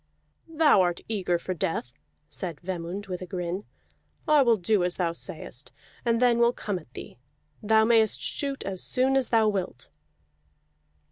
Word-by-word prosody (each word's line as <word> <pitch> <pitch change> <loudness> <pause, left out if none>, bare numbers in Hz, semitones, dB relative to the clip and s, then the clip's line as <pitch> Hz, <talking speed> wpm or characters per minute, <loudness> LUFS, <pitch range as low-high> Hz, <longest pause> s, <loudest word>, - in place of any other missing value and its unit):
"Thou 310 -10 +4
art 175 -1 0
eager 190 -5 0
for 185 +2 -4
death," 150 -7 -3 0.3
said 170 -6 -6
Vemund 180 +2 -5
with 185 -3 -5
a 185 - -6
grin. 180 +2 -4 0.6
"I 300 -1 +6
will 235 -4 +4
do 195 +1 +1
as 180 0 -1
thou 175 -2 +1
sayest, 150 -5 -5 0.3
and 230 -1 +2
then 240 -1 +4
will 235 0 +4
come 205 -6 -3
at 155 -7 -19
thee. - - -10 0.4
Thou 220 +1 +4
mayest 225 -2 +3
shoot 275 -1 -2
as 190 -2 -4
soon 260 +1 +1
as 265 -3 +2
thou 225 -2 +4
wilt." 195 -4 -3
200 Hz, 160 wpm, -27 LUFS, 175-235 Hz, 0.6 s, I